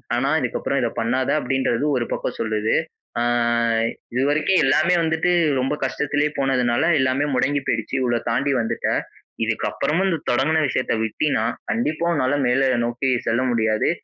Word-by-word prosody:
ஆனா - - 0
இதுக்கப்பறம் - - -1
இதை - - 0
பண்ணாத." 130 +3 0
அப்படின்றது 135 0 0
ஒரு 120 - -1
பக்கம் - - -4
சொல்லுது. 110 -1 0 0.5
"அ - - 0 0.9
இது 130 +2 +1
வரைக்கும் 155 +5 +2
எல்லாமே 155 +6 +3
வந்துட்டு 160 +2 +1 0.3
ரொம்ப 135 +3 -1
கஷ்டத்திலே 145 +2 0
போனதுனால, 130 -2 +1 0.2
எல்லாமே 130 +3 +1
முடங்கி 145 +3 +1
போயிடுச்சு. - - -2
இவ்வளோ 120 -1 +1
தாண்டி 140 +4 +1
வந்துட்ட. 115 - -2 0.5
இதுக்கப்புறமும் 150 - -1
இந்த 165 - 0
தொடங்கின 150 +6 +2
விஷயத்தை 130 -2 -1
விட்டீனா, 135 +2 0 0.3
கண்டிப்பா 145 +10 -1
உன்னால 145 -2 +1
மேல 130 +2 +2 0.2
நோக்கி 120 +3 -1 0.2
செல்ல 115 +2 +1
முடியாது. 110 -2 +1
130 Hz, 140 wpm, -22 LUFS, 120-150 Hz, 0.9 s, எல்லாமே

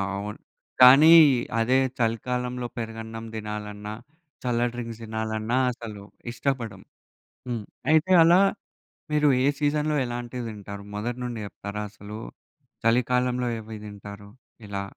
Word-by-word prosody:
అవును. 105 +1 -5 0.4
కానీ, 140 +6 +9 0.5
అదే 125 +3 +3 0.2
చలికాలంలో 125 +2 -1
పెరుగన్నం 115 0 -6
తినాలన్నా, 105 -1 -6 0.5
చల్ల 120 -1 +1
డ్రింక్స్ 115 -2 -6
తినాలన్నా 110 +1 -2
అసలు 110 -4 -9 0.3
ఇష్టపడం. 120 -5 -3 0.7
హ్మ్. 115 -3 -3 0.3
అయితే 160 +4 +3
అలా 170 +3 +6 0.7
మీరు 150 -1 +4 0.2
ఏ - - +4
సీజన్‌లో 150 +1 +1
ఎలాంటివి 120 0 -5
తింటారు? 100 -1 -8
మొదటి 120 +4 -3
నుండి 120 -2 -4
చెప్తారా? 100 +1 -6
అసలు 105 +1 -9 0.7
చలికాలంలో 125 +1 +2
ఏవేవి 110 0 -8
తింటారు? 100 0 -10 0.4
ఇలా? 100 -1 -4
115 Hz, 110 wpm, -25 LUFS, 105-125 Hz, 0.7 s, కానీ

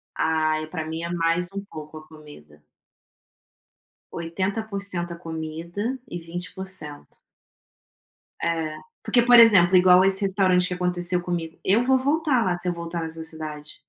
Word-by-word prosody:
Ai, 155 -1 0
pra 160 -1 -5
mim 160 +1 -5
é 170 - -4
mais 170 +1 0
um 200 0 -5
pouco, 155 -3 -10
a 155 - -17
comida. 145 - -15 1.5
80% 190 +1 -3
a - - -9
comida 170 +8 -5
e 175 - -6
20%. 175 -2 -7 1.3
É. 160 -2 -1 0.3
Porque, 240 - +3
por 245 0 +7
exemplo, 190 -5 +7
igual 180 0 +6
esse 195 +1 +3
restaurante 185 -2 +2
que 180 - -3
aconteceu 180 0 0
comigo. 170 -2 -4
Eu 225 +6 +3
vou 265 0 +4
voltar 285 -2 +1
lá, 180 -1 0
se 180 +1 -4
eu 175 - +1
voltar 170 0 -5
nessa 160 0 -6
cidade. 155 -2 -8
175 Hz, 145 wpm, -24 LUFS, 160-190 Hz, 1.5 s, por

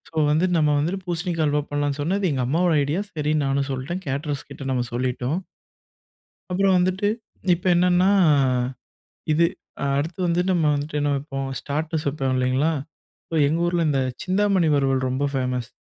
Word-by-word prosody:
So - - -34 0.2
வந்துட்டு 175 +4 +2
நம்ம 150 -2 +3
வந்துட்டு 175 +6 -1
பூசணிக்கா 170 -1 -1
அல்வா 150 0 +1
பண்லாம்னு 145 0 -1
சொன்னது 190 +5 0
எங்க 135 -2 -1
அம்மாவோட 170 +5 +2
ஐடியா. 150 +7 -1
சரி 150 0 0
நானும் 135 0 0
சொல்லிட்டேன். 135 +8 -4
கேட்டரர்ஸ் 140 +1 -3
கிட்ட - - -8
நம்ம 125 -2 0
சொல்லிட்டோம். 125 +6 -1 1.1
அப்புறம் 190 +1 +3
வந்துட்டு 185 +3 +1 0.5
இப்ப 175 +3 -4
என்னன்னா 180 +1 +4 1.2
இது 165 +2 +4 0.5
அடுத்து 160 +5 -3
வந்து 170 +1 +2
நம்ம 175 -3 +2
வந்துட்டு 145 +1 -3
என்ன 145 0 +1
வப்போம்? 135 -1 -4
ஸ்டார்ட்டர்ஸ் 155 +3 -3
வப்போம் 135 -2 -1
இல்லீங்களா? 130 +5 +1 0.6
சோ 165 - -3
எங்க 160 +3 0
ஊர்ல 175 -1 +1
இந்தச் 135 -3 0
சிந்தாமணி 190 -2 +2
வறுவல் 135 -2 +1
ரொம்ப 130 +3 0
ஃபேமஸ் 125 -2 -1
150 Hz, 150 wpm, -23 LUFS, 135-175 Hz, 1.2 s, என்னன்னா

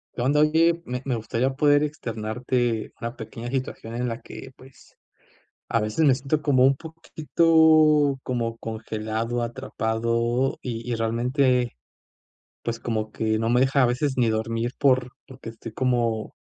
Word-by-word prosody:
¿Qué 120 - -3
onda? 145 +3 +2
Oye, 165 +2 +3
me 125 +1 -4
me 130 -3 0
gustaría 115 +4 -1
poder 145 0 +4
externarte 120 -3 -2
una 115 +2 -5
pequeña 120 0 -7
situación 130 -4 -4
en 125 +1 -1
la 115 0 -4
que, 130 - -10
pues, 135 +1 -19 0.7
a 115 - +1
veces 110 +9 +1
me 135 - +6
siento 140 +3 -1
como 135 -4 +3
un 135 +1 +5
poquito 155 -2 +3
como 115 -2 -2
congelado, 110 +1 -3
atrapado 115 +1 -1
y 115 -1 -5
y - - +1
realmente, 125 - +1 0.9
pues 115 0 -3
como 110 -2 -3
que 110 -1 0
no 115 +1 0
me 120 +1 +3
deja 135 +1 +3
a - - +5
veces 130 +3 0
ni 120 -3 +2
dormir 115 +2 -2
por 130 -2 +3 0.2
porque 130 -3 -10
estoy 115 0 -10
como 120 -3 -1
125 Hz, 155 wpm, -24 LUFS, 115-135 Hz, 0.9 s, me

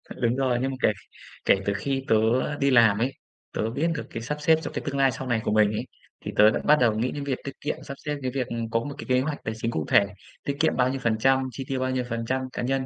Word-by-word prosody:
Đúng 120 -1 +1
rồi, 130 -2 +1
nhưng 135 +1 0
mà 130 - -5
kể - - +4 0.5
kể - - +6
từ 100 - +1
khi 135 +6 -2
tớ - - +4 0.4
đi 140 0 +3
làm 115 -5 +6
ấy, 125 +4 +1 0.4
tớ 110 - -1
biết 140 +8 0
được 150 - -4
cái 115 - -6
sắp 150 +5 -3
xếp 160 +1 +5
cho - - -5
cái - - -3
tương 140 -1 -2
lai 135 -1 +4
sau 130 - -6
này 120 -2 +1
của - - -1
mình 105 -1 +4
ấy, 105 - -3 0.4
thì - - -3
tớ 105 +1 +7
đã - - -1
bắt 150 - +5
đầu 120 -3 +4
nghĩ 125 +3 0
đến 145 - -5
việc 135 -2 -2
tiết 140 - -4
kiệm, 145 - -2
sắp 140 - -6
xếp 150 0 -1
cái 130 -1 -2
việc, 130 -2 -2
ừm, 115 -1 -4
có 115 - +1
một 140 +4 -6
cái - - -7
kế 125 0 +4
hoạch 145 +2 -3
tài 110 - -3
chính 115 +1 -2
cụ 80 -8 -2
thể, 100 - +6 0.4
tiết 140 0 -3
kiệm 160 - +2
bao 125 0 +3
nhiêu 135 +1 -2
phần 110 -2 +2
trăm, 135 +2 +3
chi 130 +3 -6
tiêu 135 -1 -2
bao 130 0 0
nhiêu 130 -1 0
phần 115 -1 -3
trăm, 130 +2 0
cá - - -3
nhân. 130 +2 0
130 Hz, 305 wpm, -26 LUFS, 115-135 Hz, 0.5 s, tớ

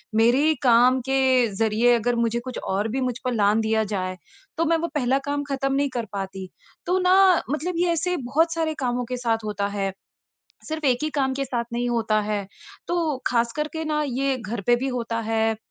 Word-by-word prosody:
मेरे 235 +4 +4
ही 315 +1 +4
काम 250 +1 +5
के 270 - +1 0.4
ज़रिए 225 +3 +3
अगर 240 +1 0
मुझे 235 0 0
कुछ 255 0 -7
और 200 +3 -1
भी 265 +3 -2
मुझ 250 -1 -1
पर 250 - 0
लाँघ 210 0 +3
दिया 220 0 +1
जाए 185 -2 -2 0.4
तो 330 - +1
मैं 330 +1 +3
वो - - +1
पहला 265 -1 +2
काम 285 0 -1
ख़त्म 275 0 -1
नहीं 280 0 +1
कर 235 -2 -2
पाती। 190 -1 -5 0.4
तो 360 +2 +1
ना 365 +1 +4 0.3
मतलब 310 +5 -2
ये 350 0 +2
ऐसे 360 +2 -1
बहुत 315 +6 +1
सारे 320 -1 -1
कामों 245 -1 -1
के 250 - -2
साथ 225 -2 -1
होता 200 -1 -2
है 195 -1 -1 0.8
सिर्फ़ 315 -1 -4
एक 250 -2 +3
ही 310 - -1
काम 265 -1 +1
के 275 0 -2
साथ 240 -2 -2
नहीं 240 +1 -1
होता 225 -2 +1
है। 205 -2 -2 0.4
तो 330 -5 0
ख़ास 235 -1 +1
करके 310 +1 -3
न 300 0 +1
ये 265 +1 0
घर 225 -1 -5
पे 240 0 +5
भी - - 0
होता 230 0 -3
है, 225 0 +1
245 Hz, 210 wpm, -24 LUFS, 225-285 Hz, 0.8 s, काम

